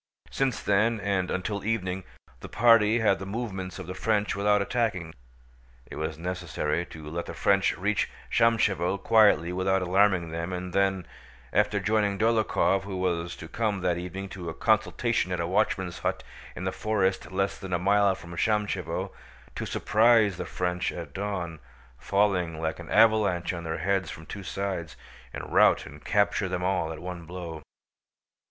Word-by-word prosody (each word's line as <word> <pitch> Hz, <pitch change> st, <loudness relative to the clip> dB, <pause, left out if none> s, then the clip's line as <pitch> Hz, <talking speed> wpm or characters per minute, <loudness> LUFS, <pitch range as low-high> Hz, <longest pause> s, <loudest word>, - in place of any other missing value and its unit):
Since 130 Hz, -8 st, -1 dB
then, 110 Hz, +3 st, +2 dB
and 100 Hz, -3 st, -1 dB
until 100 Hz, +2 st, -2 dB
evening, 95 Hz, -4 st, -2 dB, 0.3 s
the -, -, -9 dB
party 115 Hz, -1 st, +5 dB
had 110 Hz, -, +1 dB
watched 95 Hz, -, +2 dB
the 95 Hz, -, -6 dB
movements 95 Hz, -4 st, -4 dB
of -, -, -7 dB
the 90 Hz, -, -6 dB
French 105 Hz, +2 st, 0 dB
without 105 Hz, +1 st, +3 dB
attacking. 100 Hz, -6 st, -1 dB, 0.7 s
It -, -, -10 dB
was 80 Hz, 0 st, -3 dB
necessary 85 Hz, -2 st, -2 dB
to 80 Hz, -2 st, -10 dB
let 85 Hz, +3 st, -4 dB
the -, -, -6 dB
French -, -, +2 dB
reach -, -, 0 dB, 0.2 s
Shámshevo 105 Hz, -6 st, +2 dB
quietly 100 Hz, -5 st, +4 dB
without 95 Hz, +1 st, +1 dB
alarming 95 Hz, -2 st, +2 dB
them 85 Hz, +3 st, -4 dB
and 90 Hz, 0 st, -5 dB
then, 95 Hz, -2 st, +1 dB, 0.5 s
after 105 Hz, -, +2 dB
joining 105 Hz, -1 st, +1 dB
Dólokhov 110 Hz, -3 st, +2 dB
who 95 Hz, -1 st, -6 dB
was 85 Hz, -2 st, -1 dB
to 80 Hz, -, -9 dB
come 105 Hz, 0 st, -1 dB
that 90 Hz, -1 st, 0 dB
evening 90 Hz, +2 st, -6 dB
to 90 Hz, -4 st, -6 dB
a 80 Hz, -, -6 dB
consultation 110 Hz, -1 st, +1 dB
at 90 Hz, -, -1 dB
a 85 Hz, -, 0 dB
watchman's 95 Hz, -1 st, 0 dB
hut -, -, -2 dB, 0.3 s
in -, -, -6 dB
the 95 Hz, -, -1 dB
forest 95 Hz, -3 st, -1 dB
less 95 Hz, +1 st, -1 dB
than 95 Hz, -1 st, -7 dB
a 90 Hz, -, +2 dB
mile 100 Hz, +2 st, +3 dB
from 85 Hz, -, -12 dB
Shámshevo, 105 Hz, +2 st, -1 dB, 0.4 s
to -, -, -4 dB
surprise 110 Hz, -3 st, +3 dB
the -, -, -4 dB
French 90 Hz, 0 st, -1 dB
at 85 Hz, -5 st, -8 dB
dawn, 95 Hz, -5 st, -4 dB, 0.4 s
falling 90 Hz, -3 st, +1 dB
like 80 Hz, +1 st, -2 dB
an 85 Hz, -, -9 dB
avalanche 105 Hz, -6 st, +3 dB
on 85 Hz, -1 st, -6 dB
their 80 Hz, 0 st, -2 dB
heads 95 Hz, +3 st, 0 dB
from 80 Hz, -, -9 dB
two 100 Hz, -, -7 dB
sides, 95 Hz, -4 st, -4 dB, 0.3 s
and -, -, -7 dB
rout -, -, +5 dB
and -, -, -12 dB
capture 100 Hz, -1 st, +1 dB
them 90 Hz, -1 st, -2 dB
all 90 Hz, -3 st, 0 dB
at 80 Hz, -, -6 dB
one 90 Hz, 0 st, -7 dB
blow. 85 Hz, -2 st, -7 dB
95 Hz, 170 wpm, -27 LUFS, 85-105 Hz, 0.7 s, party